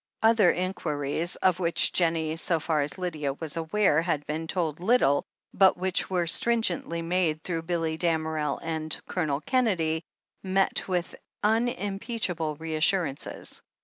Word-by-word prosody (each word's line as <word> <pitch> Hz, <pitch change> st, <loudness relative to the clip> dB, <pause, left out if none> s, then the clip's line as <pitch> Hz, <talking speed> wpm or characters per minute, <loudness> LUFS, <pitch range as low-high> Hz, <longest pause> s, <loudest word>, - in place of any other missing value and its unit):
Other 220 Hz, -4 st, +5 dB
inquiries, 165 Hz, -3 st, -2 dB
of 185 Hz, -1 st, +1 dB
which 170 Hz, -2 st, +3 dB
Jen 170 Hz, -2 st, +3 dB
nie, 160 Hz, -1 st, -2 dB
so 165 Hz, 0 st, 0 dB
far 155 Hz, -1 st, 0 dB
as 140 Hz, -1 st, -3 dB
Lydia 155 Hz, -6 st, -2 dB
was 155 Hz, +2 st, -5 dB
aware, 165 Hz, 0 st, +2 dB
had 155 Hz, -4 st, -1 dB
been 160 Hz, +2 st, -4 dB
told 160 Hz, -4 st, -2 dB
little, 180 Hz, -, +3 dB, 0.3 s
but 190 Hz, -1 st, +5 dB
which 185 Hz, 0 st, 0 dB
were 180 Hz, -2 st, 0 dB
stringently 175 Hz, -4 st, +1 dB
made 165 Hz, -2 st, 0 dB
through 165 Hz, -3 st, -2 dB
Billy 165 Hz, -1 st, -2 dB
Dam 165 Hz, -2 st, +1 dB
erel 155 Hz, -3 st, -2 dB
and 160 Hz, -1 st, -2 dB
Colonel 155 Hz, -5 st, -1 dB
Kennedy, 175 Hz, -11 st, +1 dB, 0.4 s
met 190 Hz, 0 st, 0 dB
with 180 Hz, -2 st, -2 dB, 0.3 s
unimpeachable 205 Hz, -6 st, -1 dB
re 160 Hz, +2 st, -6 dB
assurances. 155 Hz, -2 st, -1 dB
170 Hz, 145 wpm, -27 LUFS, 155-185 Hz, 0.4 s, Other